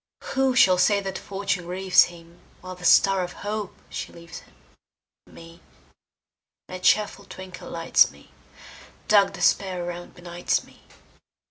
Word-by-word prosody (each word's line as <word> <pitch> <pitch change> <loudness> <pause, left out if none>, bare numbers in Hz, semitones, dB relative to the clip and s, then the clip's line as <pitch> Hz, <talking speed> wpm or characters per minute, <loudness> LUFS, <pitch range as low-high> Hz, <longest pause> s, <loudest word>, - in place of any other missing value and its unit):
Who 265 -1 +1
shall 185 -7 +5
say 200 +2 +3
that 195 -1 -5
Fortune 195 -2 -3
grieves 185 +1 +4
him, 170 0 -15 0.2
While 185 0 -8
the 180 -1 -10
star 195 +1 +5
of 180 - -6
hope 210 -1 -4
she - - -6
leaves 170 -1 -11
him? - - -22 0.7
Me, 165 0 -15 1.1
nae 185 - -7
cheerfu' 200 +1 +1
twinkle 185 -1 -10
lights 165 0 +3
me; - - -19 0.8
Dark 205 -2 +4
despair 185 -3 0
around 175 0 -8
benights 175 0 -2
me. - - -21
185 Hz, 135 wpm, -24 LUFS, 175-195 Hz, 1.1 s, shall